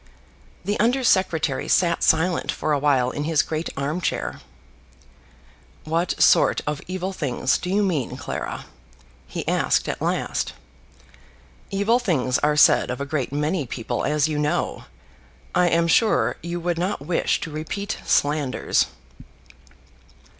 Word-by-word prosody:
The 205 +2 -1
Under 245 +4 +2
Secretary 185 -8 +1
sat 170 -2 +2
silent 165 +2 +2
for 155 - -1
awhile 140 -3 +2
in 145 +2 -4
his 160 -1 +2
great 160 +1 -3
arm 145 +6 -2
chair. - - -3 1.4
"What 165 +3 -1
sort - - +5
of 150 -1 -3
evil 185 +1 -3
things 135 -5 0
do 180 - -5
you 205 +2 +2
mean, 160 - -1
Clara?" - - -5 0.6
he 70 - -6
asked - - +1
at - - -4
last. - - -1 1.2
"Evil 205 +5 +2
things 135 - 0
are 150 0 +1
said - - +5
of 125 - -3
a 140 - -2
great 140 -3 -2
many 150 +1 -1
people, 120 +1 -3
as 150 0 +2
you 150 -1 -2
know. 150 0 -1 0.7
I 180 0 +3
am 170 0 +2
sure 220 +6 +3
you 170 +1 -4
would 170 0 -2
not 180 -3 -1
wish 170 +1 +1
to 160 - -5
repeat 160 +7 -4
slanders." 145 -2 +1
160 Hz, 140 wpm, -23 LUFS, 145-180 Hz, 1.4 s, sort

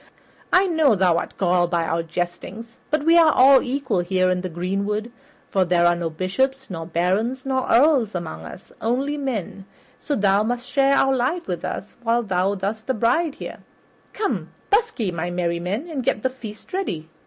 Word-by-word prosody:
I 370 +2 +5
know 315 - +3
thou 180 -3 +3
art - - -7
galled 175 -2 +2
by 170 -1 +1
our 165 +1 0
jesting, 175 +6 -5 0.2
but 305 -1 0
we 335 +1 +6
are 320 -2 +6
all 265 0 +6
equal 260 -6 -1
here 185 +1 +1
in 180 0 0
the 185 - -4
greenwood, 200 +6 -2 0.4
for 190 - +3
there 175 -1 +2
are 175 - +5
no 170 -1 -2
bishops 265 +10 -2
nor 165 -2 -5
barons 195 +10 0
nor 260 -1 -1
earls 250 -5 +4
among 80 - -5
us, 75 - -11
but - - -15
only 265 +6 0
men, 230 - -4 0.3
so 290 - -2
thou 200 -2 +3
must 245 +3 -2
share 275 0 +3
our 270 -1 +3
life 265 +8 -1
with 180 -2 -4
us 200 - -5
while 235 0 +1
thou 190 -1 0
dost 215 +4 -4
abide 270 +7 +1
here. - - -8 0.5
Come, 420 -1 -2 0.2
busk 440 - +2
ye, 205 -5 0
my 175 +1 -3
merry 175 -1 -1
men, 200 - -3
and 295 -6 -4
get 235 -4 0
the 260 - +1
feast 220 -1 -11
ready. 180 - -3
215 Hz, 190 wpm, -22 LUFS, 180-270 Hz, 0.5 s, we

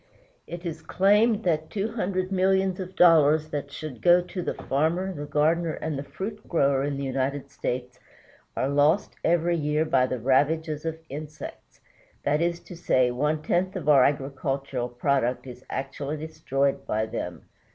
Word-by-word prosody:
It 175 +1 -7
is 160 -2 -4
claimed 210 +6 +3
that 160 -3 0
two 210 +2 -2
hundred 185 -4 -2
millions 190 0 +2
of 185 0 -6
dollars 155 -3 +5
that 145 -1 -4
should 145 -5 -7
go 175 0 +6
to 180 +1 -5
the - - -3
farmer, 165 +7 0
the 145 -3 -6
gardner, 160 +3 +1
and 155 -1 -4
the 135 - -3
fruit 190 +10 -7
grower 140 -5 +2
in 140 -1 -2
the 140 - -3
United 135 +1 -2
States 125 -2 -4 0.6
are 130 - +1
lost 145 +7 +2
every 170 0 +2
year 150 0 0
by 130 -4 +3
the 130 - -2
ravages 150 +5 +1
of 160 0 -2
insects 150 +2 -9 0.4
that 150 +2 +1
is 170 0 0
to 180 - -11
say, 130 -7 +2
one 150 +5 -1
tenth 185 +4 0
of 170 -6 -5
our 140 -4 +7
agricultural 135 -2 -1
product 125 0 0
is 125 0 -10
actually 140 +2 -4
destroyed 140 -3 -1
by 110 +1 0
them. - - -5
150 Hz, 165 wpm, -26 LUFS, 135-175 Hz, 0.6 s, our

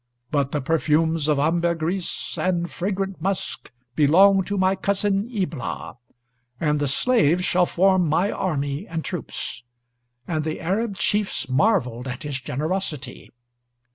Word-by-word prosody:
But 140 -2 +1
the 150 - -1
perfumes 160 +1 +1
of 150 -2 +3
ambergris, 170 +3 -1
and 175 -2 -1
fragrant 195 0 -3
musk, 195 +1 -3 0.3
belong 190 +6 +5
to 205 - -2
my 190 0 +3
cousin 200 +2 0
Ibla; 185 - -4 0.6
and 150 -2 +1
the 145 - 0
slaves 180 - +2
shall 180 0 +3
form 185 -1 +3
my 175 +7 +2
army 145 0 -2
and 165 -1 -4
troops." 180 -4 -4 0.7
And 155 -2 -1
the 155 0 -3
Arab 200 +5 -1
chiefs 205 +1 0
marveled 130 - +1
at 125 -1 -5
his 145 -3 -3
generosity.... 150 0 -3
170 Hz, 130 wpm, -23 LUFS, 150-195 Hz, 0.7 s, belong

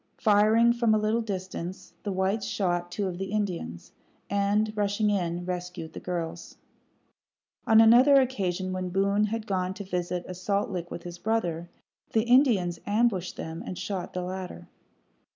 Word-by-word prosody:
Firing 220 +2 +4
from 235 -2 +2
a - - +4
little 215 +2 +1
distance, 185 -3 -6
the 205 - -3
whites 190 +3 0
shot 175 -3 -1
two 200 +2 -2
of 180 -1 -5
the 195 0 -4
Indians, 180 - -3 0.4
and, 205 +2 +1
rushing 205 +1 +1
in, 175 -3 -1
rescued 180 -2 -5
the - - -6
girls. 170 -2 -5 1.1
On 220 -1 +7
another 240 +5 +7
occasion, 190 -8 -1
when 185 -1 -3
Boone 200 +3 +2
had 220 +1 -3
gone 185 -2 -1
to 200 - -6
visit 180 -1 -3
a 185 - -5
salt 200 +3 -1
lick 175 -2 -4
with 170 - -7
his 175 0 -8
brother, 175 -7 -1 0.4
the 220 - +3
Indians 235 - +3
ambushed 205 -4 +1
them 160 +1 -6
and 180 - -6
shot 185 -3 -4
the 180 - -3
latter. 185 0 -6
190 Hz, 160 wpm, -27 LUFS, 180-215 Hz, 1.1 s, On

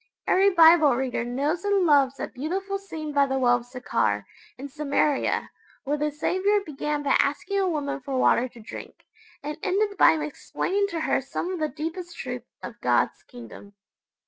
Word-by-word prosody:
Every 390 +2 +4
Bible 325 -6 +6
reader 255 -2 -2
knows 280 +8 -2
and 405 -2 +2
loves 280 -4 +4
that - - -6
beautiful 385 +8 -3
scene 315 -6 -7
by 280 -1 +3
the 265 0 -1
well 245 -2 +4
of 240 0 -11
Sychar, 250 0 -1 0.3
in 275 +3 -7
Samaria, 285 0 0 0.3
where 285 +2 -1
the 300 0 -1
Saviour 375 +7 +1
began 295 0 -3
by 275 - +2
asking 330 +8 0
a 380 -1 +1
woman 290 -4 -2
for 270 0 -3
water 255 -1 +3
to 235 - -15
drink, 215 - -10 0.4
and 300 +1 -5
ended 400 0 0
by - - +7
explaining 320 +6 -2
to 335 -5 -4
her - - +1
some 345 +7 -4
of 360 - -4
the 310 -1 0
deepest 330 +4 -6
truths 250 -2 -6
of - - -9
God's - - +1
Kingdom. 235 -4 -12
300 Hz, 175 wpm, -25 LUFS, 265-355 Hz, 0.4 s, by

